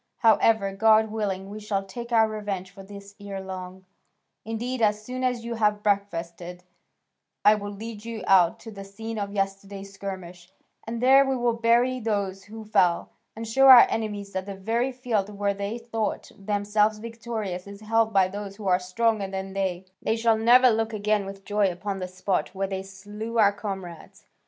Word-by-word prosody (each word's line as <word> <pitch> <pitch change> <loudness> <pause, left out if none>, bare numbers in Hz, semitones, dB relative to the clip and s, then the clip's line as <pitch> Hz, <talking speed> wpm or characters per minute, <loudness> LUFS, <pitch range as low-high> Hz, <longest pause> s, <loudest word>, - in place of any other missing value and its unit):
However, 220 -3 +3
God 220 +1 +4
willing, 195 -3 -3
we 210 +2 -8
shall 205 -2 -2
take 235 +5 -8
our 225 -1 +5
revenge 205 -4 -5
for 195 - -12
this 200 0 -11
ere 200 -1 -6
long; 185 0 -8 0.6
indeed, 235 +3 -4
as 210 -1 +2
soon 255 +2 -5
as 250 -2 -1
you 235 - -3
have 210 -2 +1
breakfasted, 180 -3 -2 0.8
I 210 - +8
will 205 -1 -4
lead 210 +1 -8
you 230 -3 -6
out 180 -3 +4
to 225 - -9
the 200 -2 -9
scene 220 +3 -7
of 200 -1 -3
yesterday's 195 0 -4
skirmish, 185 -2 -8 0.4
and 230 +1 -4
there 270 +2 +7
we 270 -1 0
will 240 -1 +1
bury 235 +2 +2
those 200 -4 -2
who 220 +1 -10
fell, 170 - +2 0.2
and 225 +1 -6
show 270 +5 +4
our 255 -2 +11
enemies 205 -3 -3
that 190 0 -4
the 200 - -5
very 230 +7 -1
field 240 -6 -2
where 200 -1 -1
they 200 +3 -4
thought 230 -2 -4
themselves 210 +1 0
victorious 220 -5 -5
is 200 +1 -10
held 225 +1 +1
by 195 -3 +4
those 200 +1 -7
who 205 -1 -7
are 180 -1 +4
stronger 205 +2 0
than 190 0 -5
they: 190 -2 -2 0.2
they 220 - 0
shall 230 0 +3
never 245 +3 +6
look 225 0 -1
again 210 -1 0
with 195 0 -10
joy 205 -2 +1
upon 195 +2 -5
the 185 - -4
spot 185 +1 -2
where 195 +1 -1
they 190 -1 -4
slew 205 +4 -7
our 205 -2 +5
comrades. 190 -5 -8
205 Hz, 185 wpm, -25 LUFS, 195-225 Hz, 0.8 s, our